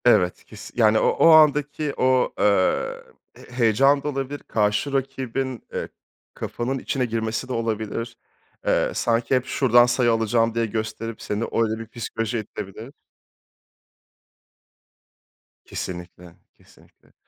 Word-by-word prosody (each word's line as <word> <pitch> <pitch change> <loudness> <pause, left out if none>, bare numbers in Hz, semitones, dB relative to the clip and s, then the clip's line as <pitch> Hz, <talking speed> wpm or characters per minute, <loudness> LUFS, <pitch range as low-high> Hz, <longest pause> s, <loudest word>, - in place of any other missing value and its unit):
Evet, 90 -7 +3
kes - - -11
yani 110 -2 +4
o - - +2
o - - +4
andaki 150 -1 +4
o, 130 0 +2
eee, 100 -3 +1 0.4
h - - -17
heyecan 135 +5 +4
da - - -3
olabilir, 135 0 -4
karşı 105 +6 0
rakibin, 135 -2 -3
eee, - - -3 0.5
kafanın 130 +3 -3
içine 130 -1 -1
girmesi 110 +1 -2
de 130 - -4
olabilir. 115 0 -3 0.5
Eee, - - +2
sanki 115 +2 +1
hep 130 0 0
şuradan 120 -2 +4
sayı 120 -1 +2
alacağım 115 0 +1
diye 115 0 +1
gösterip 110 +1 -4
seni 105 +2 -2
öyle 110 -1 -1
bir 115 - -7
psikolojiye 115 0 -4
itebilir. 105 +5 -9 2.7
Kesinlikle, 90 - -7 0.2
kesinlikle. - - -24
115 Hz, 120 wpm, -23 LUFS, 110-130 Hz, 2.7 s, yani